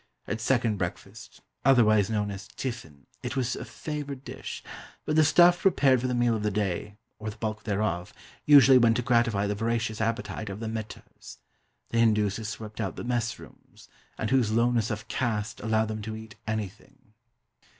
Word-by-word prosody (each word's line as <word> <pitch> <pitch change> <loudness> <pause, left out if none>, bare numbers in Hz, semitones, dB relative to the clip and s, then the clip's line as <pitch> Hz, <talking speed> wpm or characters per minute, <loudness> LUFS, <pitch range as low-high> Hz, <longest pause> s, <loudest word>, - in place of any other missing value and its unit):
At 110 +1 -3
second 115 -3 +1
breakfast 90 -2 -6 0.2
otherwise 110 -6 +5
known 105 -2 -1
as 100 0 -8
"tiffin" 95 - -7 0.2
it - - -4
was 125 -2 0
a - - -6
favoured 145 -3 -6
dish; - - -7 0.4
but 155 - 0
the 155 - +6
stuff 175 +4 +5
prepared 135 - +4
for 130 - -1
the 125 - -1
meal 120 -1 +2
of 110 - -3
the 105 - +1
day 105 0 -2 0.2
or 110 0 -4
the 110 - -9
bulk 110 0 -4
thereof 100 -3 -1 0.3
usually 135 -3 +8
went 115 -1 +4
to 125 - -1
gratify 115 -4 +2
the 105 - 0
voracious 115 +1 -1
appetite 115 -1 -2
of 100 +1 -6
the 115 - -5
"mehters," 110 - -7 0.5
the 115 - 0
Hindus 105 -3 +3
who 115 - -6
swept 105 0 -6
out 95 -4 -3
the - - -6
mess 120 -1 -1
rooms, - - -16 0.3
and 110 - -2
whose 125 -5 +3
lowness 115 0 +2
of 110 0 -4
"caste" 110 -4 -2
allowed 110 0 +1
them 110 0 -4
to 110 +1 -5
eat 110 -1 -10
"anything." 110 +3 -6
110 Hz, 180 wpm, -27 LUFS, 105-125 Hz, 0.5 s, usually